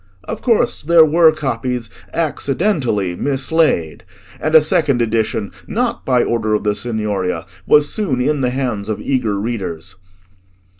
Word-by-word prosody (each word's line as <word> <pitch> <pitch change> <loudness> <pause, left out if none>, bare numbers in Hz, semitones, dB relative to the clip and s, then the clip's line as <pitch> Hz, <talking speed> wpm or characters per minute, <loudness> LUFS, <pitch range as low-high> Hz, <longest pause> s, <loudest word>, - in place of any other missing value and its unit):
Of - - -6
course 230 -4 +1
there 165 +1 +6
were 160 +1 +5
copies 125 -4 -3 0.2
accidentally 140 - -1
mislaid, 135 - 0 0.4
and 155 +1 0
a - - +11
second 145 -4 +1
edition, 110 -2 -1 0.2
not 235 +2 -2
by 125 -2 +3
order 110 -2 0
of - - -2
the 105 -1 +1
Signoria, 105 -5 -2 0.2
was 150 0 +5
soon 180 - -1
in 145 +3 0
the 125 - +1
hands 125 -6 -3
of 110 - -2
eager 115 -7 -1
readers. 95 -6 -5
125 Hz, 140 wpm, -18 LUFS, 105-155 Hz, 0.4 s, a